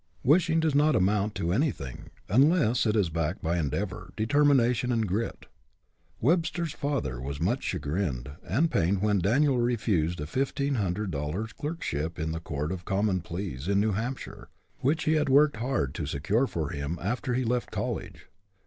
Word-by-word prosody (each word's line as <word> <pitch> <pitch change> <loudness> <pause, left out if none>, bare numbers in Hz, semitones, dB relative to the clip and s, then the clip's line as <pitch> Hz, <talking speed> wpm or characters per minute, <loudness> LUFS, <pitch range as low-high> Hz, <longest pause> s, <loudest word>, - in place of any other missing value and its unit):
Wishing 165 +3 +4
does 160 -2 +1
not 150 +2 +4
amount 100 +2 +1
to 85 - -1
anything 95 - -2 0.2
unless 125 - +3
it 105 - +2
is 95 -6 +2
backed 85 +3 -2
by 85 +2 +1
endeavor, 90 +5 -3
determination, 125 0 +3
and 115 -3 +1
grit. 105 +6 -2 0.7
Webster's 165 +2 +1
father 70 - -2
was 70 +2 -5
much 100 +11 0
chagrined 70 -5 -2
and 140 - +1
pained 95 +3 +1
when 105 -2 +3
Daniel 125 - +3
refused 105 -9 +1
a 75 - -3
fifteen 140 - -1
hundred 100 -3 -1
dollar 75 +8 -2
clerkship 110 - -4
in 80 +1 -2
the 80 - -3
court 75 -1 -3
of 95 -1 -5
common 100 -2 0
pleas 85 -5 -5
in 100 0 +3
New 110 +1 +2
Hampshire, 120 +6 -5 0.3
which 155 +5 +1
he 155 - +2
had 150 -2 +2
worked 145 -1 +5
hard 120 - -1
to - - -4
secure 105 - +1
for 80 - -3
him 70 +4 -3
after 120 +5 -2
he 130 - +1
left 120 +1 -1
college. - - -4
105 Hz, 165 wpm, -28 LUFS, 85-135 Hz, 0.7 s, worked